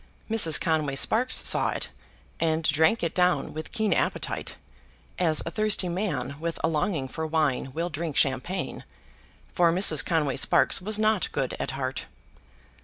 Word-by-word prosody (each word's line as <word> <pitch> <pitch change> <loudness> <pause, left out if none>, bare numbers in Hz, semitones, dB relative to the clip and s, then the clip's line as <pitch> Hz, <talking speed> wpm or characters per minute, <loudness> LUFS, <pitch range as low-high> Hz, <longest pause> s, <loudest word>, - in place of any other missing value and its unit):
Mrs. 210 -9 +5
Conway 155 -4 0
Sparkes 240 - +2
saw - - +3
it, - - -4 0.5
and 160 0 0
drank 160 +7 +2
it 170 - -1
down 180 -6 +1
with 155 +1 -7
keen 220 -3 0
appetite, - - -2 0.6
as 160 -4 +1
a 165 - -4
thirsty 215 -3 0
man 150 -8 -3
with 165 +1 -4
a - - +3
longing 155 -2 -1
for 160 +4 -5
wine 150 -5 0
will 170 +3 -3
drink 155 0 -4
champagne, 135 +8 -1 0.7
for 170 -2 +3
Mrs. 165 -6 +3
Conway 150 -6 0
Sparkes - - +3
was 210 +3 +1
not 215 0 +1
good - - -2
at - - -3
heart. - - -4
165 Hz, 155 wpm, -26 LUFS, 150-185 Hz, 0.7 s, Mrs